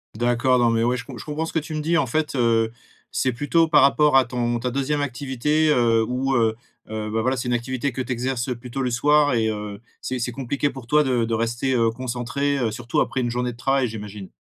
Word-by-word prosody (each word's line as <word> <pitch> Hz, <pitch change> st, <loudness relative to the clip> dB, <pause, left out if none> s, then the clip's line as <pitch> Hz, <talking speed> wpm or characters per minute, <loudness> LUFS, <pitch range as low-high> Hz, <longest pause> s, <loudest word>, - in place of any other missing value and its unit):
D'accord, 120 Hz, +2 st, +2 dB
non, 120 Hz, -1 st, +3 dB
mais 115 Hz, 0 st, +1 dB
ouais, 125 Hz, +1 st, +1 dB
je 120 Hz, -, -7 dB
com -, -, -9 dB
je -, -, -7 dB
comprends 155 Hz, +1 st, -3 dB
ce -, -, -7 dB
que 160 Hz, -, +2 dB
tu 155 Hz, +1 st, -6 dB
me 155 Hz, -, -2 dB
dis. 165 Hz, +3 st, +1 dB
En 140 Hz, -, +1 dB
fait, 155 Hz, +5 st, -1 dB
heu, 115 Hz, -2 st, +2 dB, 0.4 s
c'est 130 Hz, -, 0 dB
plutôt 155 Hz, +6 st, +2 dB
par 145 Hz, -3 st, +5 dB
rapport 145 Hz, 0 st, +5 dB
à 130 Hz, -, +5 dB
ton 120 Hz, -1 st, -1 dB
ta 125 Hz, +1 st, -2 dB
2e 140 Hz, +2 st, -1 dB
activité, 145 Hz, +3 st, 0 dB
heu, 115 Hz, -5 st, +3 dB
où, 130 Hz, +3 st, -1 dB
heu 115 Hz, -2 st, +2 dB, 0.3 s
heu, 110 Hz, -1 st, -4 dB
bah, 110 Hz, 0 st, 0 dB
voilà, 130 Hz, +3 st, 0 dB
c'est 125 Hz, -, -3 dB
une 125 Hz, -, 0 dB
activité 130 Hz, +3 st, -2 dB
que 130 Hz, -, -4 dB
tu 130 Hz, -, -5 dB
exerces 125 Hz, 0 st, -2 dB
plutôt 125 Hz, +2 st, -6 dB
le 125 Hz, -, 0 dB
soir 145 Hz, +3 st, +3 dB
et 110 Hz, -1 st, +1 dB
heu, 105 Hz, -1 st, -5 dB, 0.2 s
c'est 130 Hz, -, -3 dB
c'est 120 Hz, 0 st, -2 dB
compliqué 135 Hz, +3 st, -2 dB
pour 130 Hz, -3 st, -10 dB
toi 150 Hz, +2 st, +4 dB
de 125 Hz, -4 st, +1 dB
de 115 Hz, -, -3 dB
rester, 120 Hz, +3 st, -1 dB
heu, 115 Hz, -2 st, +3 dB
concentré, 130 Hz, +4 st, -2 dB
heu, 120 Hz, -5 st, 0 dB
surtout 120 Hz, +1 st, -1 dB
après 130 Hz, -, -1 dB
une 120 Hz, -, -1 dB
journée 125 Hz, +1 st, -1 dB
de 115 Hz, -, -13 dB
travail, 135 Hz, +1 st, +1 dB
j'imagine? 105 Hz, -3 st, -8 dB
125 Hz, 250 wpm, -23 LUFS, 115-140 Hz, 0.4 s, par